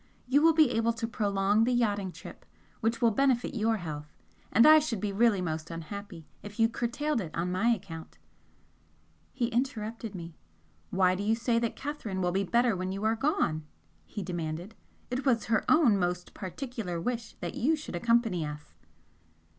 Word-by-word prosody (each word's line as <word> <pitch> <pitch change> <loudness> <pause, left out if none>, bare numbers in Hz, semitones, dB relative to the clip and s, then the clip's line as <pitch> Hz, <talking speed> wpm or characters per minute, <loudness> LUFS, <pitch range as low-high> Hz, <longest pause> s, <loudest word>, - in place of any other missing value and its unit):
You 275 +3 +4
will 325 +1 +6
be 310 -6 +5
able 230 0 +1
to 230 0 -3
prolong 205 -2 +1
the 245 - +2
yachting 205 -6 +1
trip - - -11 0.4
which 230 +2 -1
will 230 - +5
benefit 260 +2 +1
your 225 -2 +1
health, 150 -5 -6 0.4
and 230 +4 +6
I 310 0 +9
should 270 -9 -2
be 205 +1 -2
really 205 -1 +3
most 160 -1 -3
unhappy 170 +1 -7 0.2
if 205 +2 -10
you 225 - +6
curtailed 240 +4 -1
it 170 - -5
on 175 +2 -1
my 185 +6 +1
account 180 -8 -4 0.6
" - - -37
He 240 -3 0
interrupted 230 -3 -3
me. 170 -2 -7 0.6
"Why 185 -1 +3
do 185 - -3
you 215 +2 +2
say 230 0 +1
that 235 -1 -2
Catherine 270 -9 -4
will 180 -1 +1
be 195 +2 +1
better 235 +2 +2
when 185 +1 -3
you 195 +2 -4
are 220 +1 +2
gone?" 220 - 0 0.4
he 205 - -5
demanded 170 +2 -4 0.4
"It 255 +2 -1
was 245 -5 +2
her 225 - +3
own 260 -11 +5
most 180 0 -2
particular 205 -3 -5
wish 235 +4 -3
that - - -4
you 305 +7 +2
should 305 - -7
accompany 225 -3 +2
us." 150 0 -7
220 Hz, 180 wpm, -29 LUFS, 185-240 Hz, 0.6 s, I